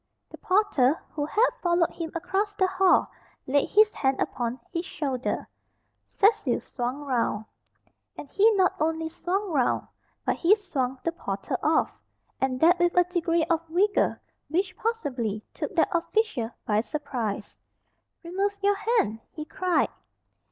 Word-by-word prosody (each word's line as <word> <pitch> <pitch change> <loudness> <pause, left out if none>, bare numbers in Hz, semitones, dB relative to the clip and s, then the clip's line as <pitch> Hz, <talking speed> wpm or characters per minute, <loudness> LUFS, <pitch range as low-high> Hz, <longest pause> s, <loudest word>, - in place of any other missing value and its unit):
The - - -10
porter 365 -8 +2
who 290 -1 -3
had 445 +9 +3
followed 345 -1 +2
him 325 -2 -6
across 385 +5 -1
the 380 - +3
hall 375 0 +3 0.3
laid 280 +2 +1
his 425 +1 +5
hand 265 -1 0
upon 240 +1 -2
his 335 -1 -2
shoulder. 275 -7 -3 0.6
Cecil 415 +2 +2
swung 250 +3 -4
round. 235 -5 0 0.7
And - - -8
he 415 +9 +4
not 375 -2 +3
only 320 +1 0
swung 375 +4 -2
round, 265 -6 +1 0.4
but - - +1
he 360 +5 +5
swung 270 - -3
the 335 - 0
porter 195 - -4
off, 310 +1 +2 0.5
and 260 -1 0
that 350 +3 +5
with 350 0 +2
a 355 - +7
degree 340 -2 0
of 330 -1 +1
vigour 390 +6 +2 0.3
which 365 +4 0
possibly 250 - -2
took 405 - -5
that 330 - +3
official 340 - 0 0.2
by 210 0 +2
surprise. 230 -4 -4 0.7
"Remove 395 +4 -1
your 405 0 +3
hand!" 410 - +1
he 305 - -7
cried. 365 +2 +1
335 Hz, 145 wpm, -26 LUFS, 265-385 Hz, 0.7 s, a